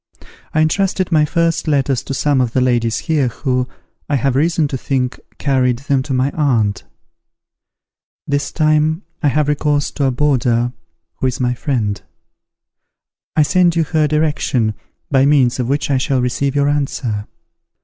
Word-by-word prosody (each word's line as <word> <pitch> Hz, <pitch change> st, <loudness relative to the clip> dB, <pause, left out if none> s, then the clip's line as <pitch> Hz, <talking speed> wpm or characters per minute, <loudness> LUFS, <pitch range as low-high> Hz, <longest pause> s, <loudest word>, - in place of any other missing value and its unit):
I 155 Hz, -, +2 dB
entrusted 185 Hz, +3 st, +1 dB
my 155 Hz, -2 st, +4 dB
first 165 Hz, +1 st, 0 dB
letters 135 Hz, -4 st, +1 dB
to 135 Hz, -, -3 dB
some 145 Hz, -1 st, +2 dB
of 120 Hz, -3 st, -1 dB
the -, -, +2 dB
ladies 120 Hz, -3 st, +1 dB
here, 150 Hz, -5 st, 0 dB
who, 125 Hz, +1 st, -1 dB, 0.4 s
I 145 Hz, -, +2 dB
have 135 Hz, 0 st, +1 dB
reason 160 Hz, +2 st, +2 dB
to 135 Hz, -, -3 dB
think, 125 Hz, -1 st, -2 dB, 0.2 s
carried 130 Hz, -3 st, +1 dB
them 140 Hz, 0 st, 0 dB
to 135 Hz, -, -7 dB
my 130 Hz, +2 st, +1 dB
aunt. 115 Hz, -9 st, 0 dB, 1.4 s
This 145 Hz, 0 st, -1 dB
time 155 Hz, +2 st, +1 dB, 0.2 s
I 150 Hz, -, +2 dB
have 145 Hz, +2 st, +1 dB
recourse 150 Hz, -1 st, 0 dB
to 140 Hz, -, -1 dB
a 135 Hz, -, +2 dB
boarder, 125 Hz, -3 st, +1 dB, 0.4 s
who 130 Hz, -, 0 dB
is 125 Hz, -, -2 dB
my 125 Hz, -1 st, +1 dB
friend. 115 Hz, -6 st, -2 dB, 1.3 s
I 155 Hz, -, +5 dB
send 175 Hz, +2 st, +3 dB
you 165 Hz, -, +3 dB
her 155 Hz, -1 st, +1 dB
direction, 145 Hz, -7 st, 0 dB, 0.4 s
by 135 Hz, 0 st, +4 dB
means 130 Hz, -4 st, +3 dB
of 125 Hz, -1 st, -1 dB
which 145 Hz, +1 st, 0 dB
I 135 Hz, -, +2 dB
shall 135 Hz, 0 st, 0 dB
receive 130 Hz, +3 st, -1 dB
your 140 Hz, 0 st, +2 dB
answer. 130 Hz, -7 st, -2 dB
140 Hz, 160 wpm, -17 LUFS, 125-150 Hz, 1.4 s, I